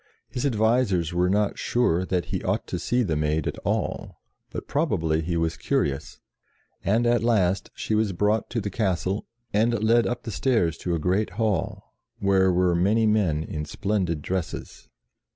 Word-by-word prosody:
His 125 +3 -1
advisers 110 - +1
were 90 +1 +2
not 105 +1 +1
sure 95 -7 +1
that 90 -2 0
he - - -1
ought - - -1
to - - -4
see 125 +1 +1
the 85 -8 -1
Maid 75 0 0
at - - -3
all; - - -3 0.3
but - - -6
probably 85 - 0
he 85 +1 -2
was 80 -1 -1
curious, 70 -1 -1 0.6
and 115 +4 +2
at 120 0 +3
last 100 -5 +2
she - - -3
was 110 -1 +2
brought 105 +4 0
to 115 - -1
the 100 -1 -4
castle, 95 -1 -1 0.3
and 110 +1 +2
led 115 +1 +4
up 120 - -3
the 115 - -5
stairs 105 - +1
to 85 -1 -1
a - - -2
great 95 +7 +1
hall, 105 -7 -1 0.2
where 95 -1 +3
were 90 0 +2
many 100 +6 +3
men 95 -8 +2
in 75 -1 -4
splendid 90 -1 -2
dresses. 90 -8 -5
95 Hz, 170 wpm, -25 LUFS, 85-110 Hz, 0.6 s, led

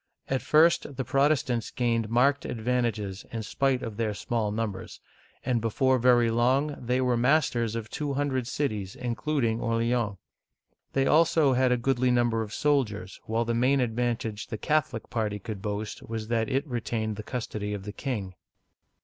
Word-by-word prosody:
At 135 -1 0
first 155 -2 +3
the 130 - -2
Protestants 135 -3 +1
gained 115 -3 0
marked 140 +5 +3
advantages 110 -4 -2
in 115 -1 -4
spite 135 +3 0
of 110 -2 -6
their 110 -3 -1
small 110 -1 -1
numbers, 105 -2 -4 0.5
and 120 -3 +1
before 130 +3 +2
very 120 -1 +4
long 130 +6 +2
they 125 +2 +1
were 125 -1 +2
masters 120 -3 +2
of 115 -1 -4
two 145 +3 -3
hundred 135 -4 -1
cities, 105 -9 -2
includ 125 +4 -1
ing 115 0 0
Orleans. 115 -2 0 0.8
They 135 0 +2
also 155 -2 +4
had 130 0 +3
a 125 - +3
goodly 130 +1 +1
number 120 -2 +2
of 105 -2 -5
soldiers, 110 -10 0
while 115 +1 0
the 115 - 0
main 130 +4 +3
advantage 115 -2 -1
the 110 - -5
Catholic 150 -4 0
party 110 -3 -1
could 105 0 -7
boast 105 +1 -4
was 110 -1 -5
that 115 -2 +1
it 135 +3 0
retained 115 -4 -2
the 110 - -6
custody 105 -3 -4
of 100 - -7
the 105 +1 -6
king. 110 -10 -4
120 Hz, 165 wpm, -27 LUFS, 110-130 Hz, 0.8 s, very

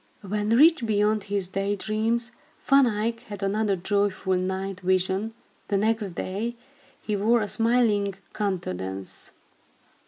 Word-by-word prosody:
When 210 +1 -2
rich 295 +5 +6
beyond 210 -1 +1
his 200 -2 -1
day 195 +2 -1
dreams, 225 +3 -1 0.3
Van 275 -1 +5
Eyck 230 +1 -1
had 205 -2 -7
another 200 0 +1
joyful 195 0 0
night 190 +1 -2
vision. 190 +4 0 0.3
The 200 - +1
next 215 -3 0
day, 215 +8 -3 0.5
he 210 - -1
wore 220 +4 +3
a - - -3
smiling 225 -4 +2 0.2
countenance. 95 - -4
205 Hz, 125 wpm, -26 LUFS, 190-225 Hz, 0.5 s, rich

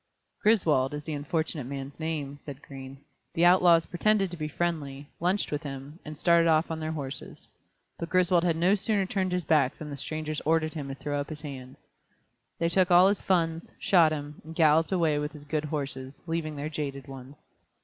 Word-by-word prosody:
"Griswold 155 - +3
is 150 - -6
the 155 - -4
unfortunate 150 -1 -2
man's 140 +1 -7
name," 150 -3 -3
said 140 -2 -9
Green. 135 -1 -9 0.4
"The 170 - +4
outlaws 175 -2 +6
pretended 195 +1 +1
to - - -5
be 155 -1 -3
friendly, 145 -4 -3
lunched 180 +4 0
with 150 0 -2
him, 140 +2 -8
and 155 0 -8
started 170 +1 +4
off 160 +1 +3
on 160 - -3
their 155 0 -3
horses. 140 -3 -7 0.5
But 170 - -4
Griswold 180 -1 +3
had 170 -2 +2
no 175 +4 +3
sooner 205 0 +1
turned 190 -1 -1
his 180 -1 -1
back 140 -5 +2
than 150 -1 -7
the - - -4
strangers 155 +1 -4
ordered 155 0 +1
him 150 -4 -5
to 135 - -5
throw 145 +1 -3
up 145 - -4
his 155 -2 -7
hands. 130 -3 -9 0.7
They 170 - +1
took 185 +1 +3
all 180 +2 +7
his 200 - 0
funds, 165 -3 0
shot 170 -5 +4
him, 145 -1 -5
and 160 +1 -10
galloped 160 +1 +4
away 165 -5 +2
with 150 0 -3
his 145 -1 -11
good 155 +1 -2
horses, 140 -3 -5
leaving 165 -2 -3
their 145 +1 -4
jaded 145 -3 -5
ones. 135 +1 -11
155 Hz, 200 wpm, -28 LUFS, 145-170 Hz, 0.7 s, all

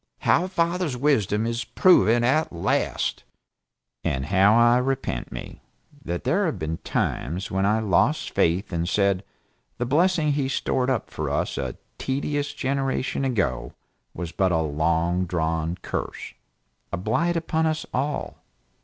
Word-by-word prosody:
How 180 - +3
father's 170 -5 0
Wisdom 115 -6 +2
is 115 +1 -2
proven 120 - +4
at 145 +6 +2
last! 85 - -1 0.8
And 65 +1 -1
how 100 +5 +4
I 120 +1 +5
repent 135 +1 -2
me, - - -8 0.4
that 85 0 -3
there 195 +2 +2
have 155 - -2
been 80 -1 -3
times 90 +7 -2
when 95 +1 +1
I 110 +2 +2
lost 95 -6 +2
faith 90 +4 +1
and 85 +1 -1
said, 100 -1 +2 0.5
the 120 - -1
blessing 160 +3 +2
he 140 -2 0
stored 130 -1 0
up 130 -3 -1
for - - -3
us - - -1
a 65 -3 -4 0.2
tedious 145 +2 -1
generation 135 0 -1
ago 95 - -1 0.4
was 85 -1 -5
but 95 +2 +1
a 85 - +2
long 85 +4 0
drawn 80 0 -1
curse, - - -4 0.6
a - - -2
blight 135 - 0
upon 160 -1 0
us 155 0 -1
all. 140 +3 -2
115 Hz, 145 wpm, -24 LUFS, 90-145 Hz, 0.8 s, I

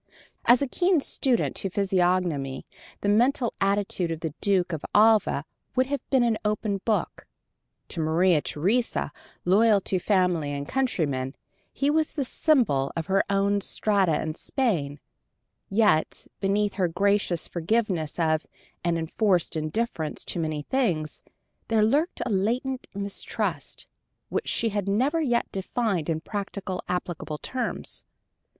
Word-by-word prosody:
To 250 +4 +6
a - - -6
keen 355 +5 +2
student 260 -3 0
of 195 -2 -3
physiognomy 180 -8 0 0.4
the - - -1
mental 240 +3 +2
attitude 195 -3 +1
of 165 -1 -4
the 160 -3 -3
Duke 185 -3 +2
of 155 - -4
Alva 210 -8 +4 0.3
would 255 0 +3
have 280 +1 -2
been 265 -3 +4
an 230 -2 +1
open 210 -2 -1
book. 220 -2 -1 0.6
To 170 - -5
Maria 160 +1 +3
Theresa, 210 +14 0 0.3
loyal 205 +3 +5
to 185 0 0
family 180 -6 +1
and 140 0 -4
countrymen, 150 - -1 0.4
he 280 +1 +1
was 315 0 +1
the 280 -4 -1
symbol 235 - +2
of 165 - -2
her 195 +1 +2
own 200 0 +2
strata 195 -5 +1
in 155 - -2
Spain 165 - -1 0.7
yet, 205 -6 +2
beneath 200 +1 +1
her 185 -3 +2
gracious 200 -1 +1
forgiveness 175 -3 -1
of 155 -2 +1 0.4
and 170 -1 +1
enforced 175 +2 +1
indifference 155 -1 -2
to - - -3
many 155 -2 -2
things, 170 - -1 0.5
there 220 -2 +3
lurked 290 +10 +1
a - - -2
latent 245 +7 -1
mistrust, 200 0 -3 0.4
which - - -2
she 230 - +1
had 200 -2 -2
never 265 +11 +2
yet 240 -6 +1
defined 195 -4 -1
in 160 -1 -1
practical, 200 -1 -4
applicable 175 -3 -3
terms. 255 +10 -3
195 Hz, 135 wpm, -26 LUFS, 165-230 Hz, 0.7 s, To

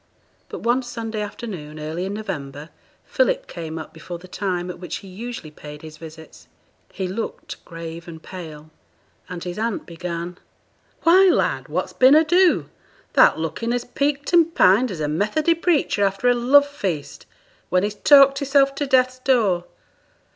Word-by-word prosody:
But - - -7
one 240 +2 +2
Sunday 225 -3 -5
afternoon 190 -8 -7
early 160 +4 -4
in 195 +1 -4
November, 150 -8 -6 0.4
Philip - - +1
came 165 -2 -7
up 160 - -8
before 175 -1 -8
the 180 +2 -14
time 180 -1 -3
at 175 - -12
which 180 - -5
he 195 - -9
usually 215 -3 -8
paid 150 0 -11
his 155 -1 -10
visits. 160 0 -13 0.4
He 190 -1 -4
looked 205 +5 -6
grave 165 0 -8
and 160 -1 -10
pale; 155 -4 -10 0.6
and 180 -2 -6
his 180 +3 -5
aunt 225 -1 -2
began, 170 +1 -6 0.6
'Why, 370 +3 +6
lad! - - +1
what's - - -3
been 260 +3 +6
ado? 350 +3 +4 0.5
Thou'rt - - +6
looking 165 +9 -3
as 245 0 -2
peaked 285 +4 -2
and 335 -1 +4
pined 215 +8 +5
as 175 -6 -5
a 150 - 0
Methody 210 - +1
preacher 330 - +1
after 195 +4 0
a 245 - +6
love 265 +4 +5
feast, 190 - -5 0.4
when 180 +1 +2
he's 205 0 -1
talked 275 +4 +6
hisself 275 0 +3
to 285 +1 -3
Death's 255 -1 +2
door. 215 -10 +2
200 Hz, 160 wpm, -22 LUFS, 170-260 Hz, 0.6 s, Why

